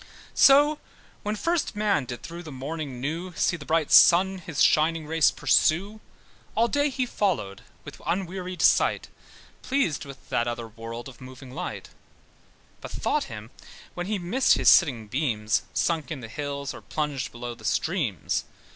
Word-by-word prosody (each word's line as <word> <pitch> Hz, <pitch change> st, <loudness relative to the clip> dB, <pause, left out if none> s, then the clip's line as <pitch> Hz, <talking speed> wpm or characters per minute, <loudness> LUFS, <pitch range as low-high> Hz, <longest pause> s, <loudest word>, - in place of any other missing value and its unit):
So 290 Hz, +2 st, +6 dB, 0.4 s
when 210 Hz, +1 st, -2 dB
first 330 Hz, 0 st, -1 dB
man 205 Hz, -9 st, +1 dB
did 120 Hz, -1 st, -7 dB
through 170 Hz, +1 st, -7 dB
the 160 Hz, -3 st, -9 dB
morning 140 Hz, 0 st, -5 dB
new 165 Hz, +7 st, -4 dB
See -, -, +1 dB
the 145 Hz, -4 st, -10 dB
bright 160 Hz, -2 st, +1 dB
sun 190 Hz, +2 st, +6 dB
his 160 Hz, -5 st, -7 dB
shining 160 Hz, +1 st, +3 dB
race 160 Hz, 0 st, +3 dB
pursue, 195 Hz, +7 st, +1 dB, 0.6 s
All 230 Hz, +1 st, +3 dB
day 285 Hz, +3 st, +1 dB
he 260 Hz, -1 st, -1 dB
followed 175 Hz, -, -2 dB, 0.2 s
with -, -, -11 dB
unwearied 180 Hz, 0 st, -3 dB
sight, -, -, +3 dB, 0.5 s
Pleased 255 Hz, -, 0 dB
with 135 Hz, -2 st, -12 dB
that 120 Hz, -, 0 dB
other 120 Hz, -1 st, -4 dB
world 115 Hz, +1 st, -8 dB
of 135 Hz, 0 st, -13 dB
moving 130 Hz, 0 st, -11 dB
light; -, -, -6 dB, 0.9 s
But -, -, -7 dB
thought -, -, -1 dB
him -, -, -9 dB, 0.4 s
when 175 Hz, 0 st, -5 dB
he 210 Hz, 0 st, -1 dB
missed 195 Hz, +9 st, +2 dB
his -, -, +4 dB
setting 125 Hz, -, +4 dB
beams, 110 Hz, -4 st, 0 dB
Sunk 165 Hz, -3 st, -1 dB
in 150 Hz, -5 st, -5 dB
the 115 Hz, -, -7 dB
hills, 140 Hz, +2 st, -4 dB
or -, -, -10 dB
plunged 150 Hz, -4 st, -3 dB
below 120 Hz, 0 st, -6 dB
the 115 Hz, -1 st, -16 dB
streams. 130 Hz, -, -1 dB
155 Hz, 160 wpm, -26 LUFS, 130-190 Hz, 0.9 s, So